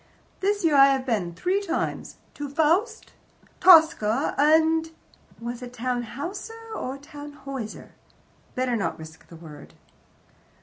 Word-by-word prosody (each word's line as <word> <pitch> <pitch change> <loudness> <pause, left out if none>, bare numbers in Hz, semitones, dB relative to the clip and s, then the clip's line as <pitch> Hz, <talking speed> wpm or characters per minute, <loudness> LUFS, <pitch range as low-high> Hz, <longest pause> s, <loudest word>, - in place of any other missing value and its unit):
"This 405 -1 0
year 315 - +3
I 275 0 +8
have 270 -1 0
been 195 -9 -2
three 375 - 0
times 400 - -3 0.2
to 290 -1 -6
FAUST, 340 - 0 0.5
TOSCA, 315 - +5
and 320 +2 +3 0.3
" - - -30
Was 240 +1 -6
it 250 0 -9
"Tannhouser" 285 - -5
or 265 -9 -5
"Tannhoyser"? 285 -5 -9 0.6
Better 255 -1 0
not 210 - -2
risk 160 0 -13
the 170 - -13
word. 155 -3 -13
280 Hz, 125 wpm, -25 LUFS, 240-325 Hz, 0.6 s, I